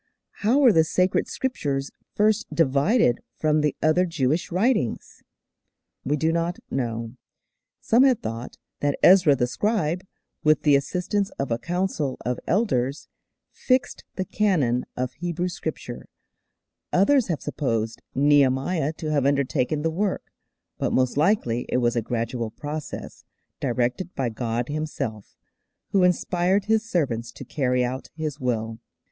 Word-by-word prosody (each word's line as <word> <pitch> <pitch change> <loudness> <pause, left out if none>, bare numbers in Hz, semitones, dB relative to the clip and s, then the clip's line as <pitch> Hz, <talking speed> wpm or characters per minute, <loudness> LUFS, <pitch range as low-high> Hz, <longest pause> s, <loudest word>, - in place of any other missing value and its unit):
How 225 +6 +2
were 265 -6 +6
the 160 - +5
sacred 180 +3 +1
Scriptures 140 - -2 0.2
first 215 +1 +2
divided 145 - +3 0.2
from 155 -1 +2
the 150 -1 0
other 175 +4 +3
Jewish 155 0 0
writings? 185 - 0 0.8
We 145 +3 0
do 160 +3 +1
not 170 +1 -1
know. 115 -2 -3 0.6
Some 230 +3 +4
have 260 -3 +4
thought 115 - -6 0.2
that 145 -1 0
Ezra 180 -6 +7
the 125 -2 +1
scribe, 180 - -1 0.4
with 155 0 +3
the 145 -2 +5
assistance 180 +7 0
of 135 -3 -3
a 115 - 0
council 170 -3 -2
of 125 0 -1
elders, 145 - 0 0.4
fixed 255 0 0
the 190 - -2
canon 155 - +1
of 125 0 -2
Hebrew 175 +2 -3
Scripture; 155 -8 -6 0.8
others 240 +7 +4
have 160 -7 -2
supposed 115 -7 -2
Nehemiah 145 +3 +3
to 155 -1 -4
have 140 -3 +2
undertaken 140 +1 0
the 165 - +1
work; 195 +4 -2 0.5
but - - 0
most 130 -1 +2
likely 145 - +1
it - - +1
was 120 -1 +1
a 120 - +1
gradual 115 0 -3
process, 150 +6 -7 0.4
directed 125 +7 -1
by 130 -3 0
God 115 +1 -2
Himself, 145 -9 -4 0.6
who 195 - +3
inspired 180 +2 +2
His 220 +1 +1
servants 120 - -1
to - - -10
carry 125 -3 0
out 130 +2 -4
His 155 -2 -4
will. 115 -3 -2
150 Hz, 140 wpm, -24 LUFS, 125-180 Hz, 0.8 s, Ezra